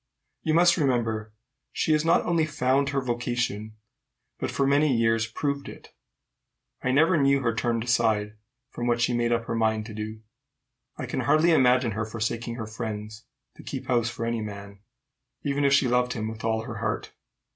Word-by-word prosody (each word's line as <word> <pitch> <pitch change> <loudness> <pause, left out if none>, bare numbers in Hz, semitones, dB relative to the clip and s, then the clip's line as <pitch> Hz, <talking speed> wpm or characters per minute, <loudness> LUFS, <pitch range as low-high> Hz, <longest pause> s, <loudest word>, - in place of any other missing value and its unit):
"You 155 - 0
must 175 +2 +5
remember 115 -7 0 0.4
she - - 0
has 155 0 +3
not 165 +1 +3
only 165 -2 +1
found 140 -1 +1
her 140 -1 0
vocation, 120 -3 -2 0.7
but - - -2
for 140 - 0
many 145 +2 +3
years 115 0 +2
proved 140 +4 -3
it. - - -13 0.9
I 130 - 0
never 155 +4 +4
knew 140 0 +3
her 115 -2 +1
turned 115 0 -1
aside 110 -3 +1 0.4
from 120 - -4
what 120 -1 +2
she 125 +1 +2
had 120 - 0
made 120 0 +1
up 115 -1 0
her - - -3
mind 110 -1 +1
to. 110 0 -6 0.8
I - - -4
can 125 - -3
hardly 155 +7 +3
imagine 125 -5 +4
her 110 +1 -2
forsaking 115 +1 -3
her 115 -2 -5
friends 110 0 -6 0.3
to - - -10
keep - - -6
house 120 -2 +2
for 115 -1 -4
any 115 -1 -1
man, 100 -1 -8 0.6
even 145 0 0
if 140 - +4
she 140 -2 +4
loved 125 0 +1
him 110 -1 -3
with 110 0 -7
all 110 0 0
her - - -7
heart. - - -3
120 Hz, 185 wpm, -26 LUFS, 110-140 Hz, 0.9 s, must